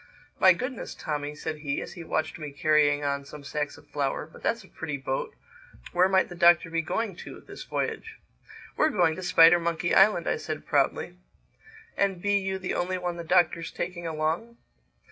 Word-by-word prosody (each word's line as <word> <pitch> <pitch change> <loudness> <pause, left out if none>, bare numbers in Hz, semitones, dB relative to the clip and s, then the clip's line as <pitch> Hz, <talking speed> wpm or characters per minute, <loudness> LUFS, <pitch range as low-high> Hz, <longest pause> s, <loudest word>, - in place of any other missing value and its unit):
"My 185 -1 +7
Goodness, 255 +7 -5
Tommy," 150 -1 -4
said 155 +1 -5
he, 145 -2 -2
as - - -7
he 175 - -8
watched 160 -1 -2
me 150 -2 -6
carrying 145 0 +2
on 140 0 -1
some 145 +1 -11
sacks 150 +1 -3
of - - -17
flour, 140 0 -2
"but 160 - -16
that's 230 -2 -1
a - - -16
pretty 155 -4 -5
boat! 135 0 -3 0.6
Where 180 +2 +3
might 190 -1 +3
the - - -9
Doctor 170 -1 +4
be 165 0 +1
going 205 +4 -2
to - - -9
this - - -11
voyage?" 445 0 -4 0.6
"We're 310 - +3
going 175 - +2
to - - -5
Spidermonkey 170 -1 +4
Island," 195 -3 +5
I - - +1
said 155 -1 -6
proudly. 145 +5 0 0.8
"And 195 -2 0
be 205 +2 +2
you 190 0 -2
the 185 -1 -4
only 185 +1 -1
one 175 -1 -3
the 170 - -5
Doctor's 170 -1 +2
taking 175 -1 -5
along?" 165 +9 -2
170 Hz, 185 wpm, -27 LUFS, 150-185 Hz, 0.8 s, My